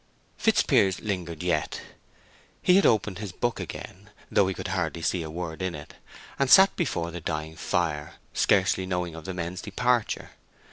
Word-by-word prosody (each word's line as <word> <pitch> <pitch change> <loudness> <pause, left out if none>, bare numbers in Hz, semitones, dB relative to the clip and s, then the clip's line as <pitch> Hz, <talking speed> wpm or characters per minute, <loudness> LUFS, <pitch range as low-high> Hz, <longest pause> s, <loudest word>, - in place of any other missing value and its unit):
Fitzpiers 95 -2 +3
lingered 90 -5 -4
yet. 85 -4 -1 0.8
He 180 - +5
had 195 - +6
opened 105 -4 +1
his 105 -3 -5
book 120 +6 -2
again, 100 +3 -8 0.2
though 100 - +4
he 95 - -1
could - - -5
hardly 85 -3 -2
see 85 +1 +1
a 80 - -5
word 85 +1 -5
in 95 -2 -2
it, 75 0 -10 0.5
and 140 -1 +2
sat 190 +6 +8
before 85 - -1
the 85 +1 -6
dying 80 0 -4
fire, 75 -4 -1 0.2
scarcely 95 -1 +2
knowing 90 -2 -2
of 80 -1 -9
the 95 - -4
men's 90 +1 -4
departure. 120 +2 0
90 Hz, 170 wpm, -27 LUFS, 85-100 Hz, 0.8 s, sat